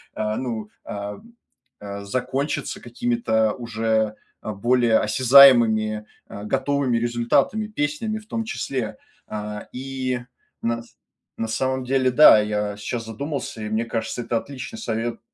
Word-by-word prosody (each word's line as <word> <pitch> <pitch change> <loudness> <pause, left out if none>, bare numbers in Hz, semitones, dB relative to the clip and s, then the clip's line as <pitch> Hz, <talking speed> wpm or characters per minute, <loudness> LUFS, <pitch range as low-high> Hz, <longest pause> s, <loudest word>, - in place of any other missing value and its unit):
а, 110 0 -1
ну, 115 -4 -4 0.2
а, 100 0 -5 0.6
а, 100 0 -7
закончиться 130 +6 -2
какими-то 115 -2 0
уже, 110 -2 -1 0.3
а, 110 - -4
более 120 +2 +3
осязаемыми, 115 -3 +6 0.2
э, 100 - -8
готовыми 135 0 +1
результатами, 120 - +1
песнями 210 +3 -2
в 215 - -17
том 225 0 -2
числе, 130 - -3 0.3
а. 105 0 -6
И, 130 -1 -3 0.4
на 115 0 -1
с 115 - -23 0.4
на 115 - -1
самом 130 +4 -1
деле, 130 0 +2
да, 125 -4 +8
я 105 -1 -1
сейчас 115 +3 -4
задумался 125 +1 -5
и 105 - -4
мне 110 +2 0
кажется 115 +1 -3
это 115 0 -1
отличный 140 - -7
совет. 115 - -3
120 Hz, 135 wpm, -23 LUFS, 110-130 Hz, 0.6 s, да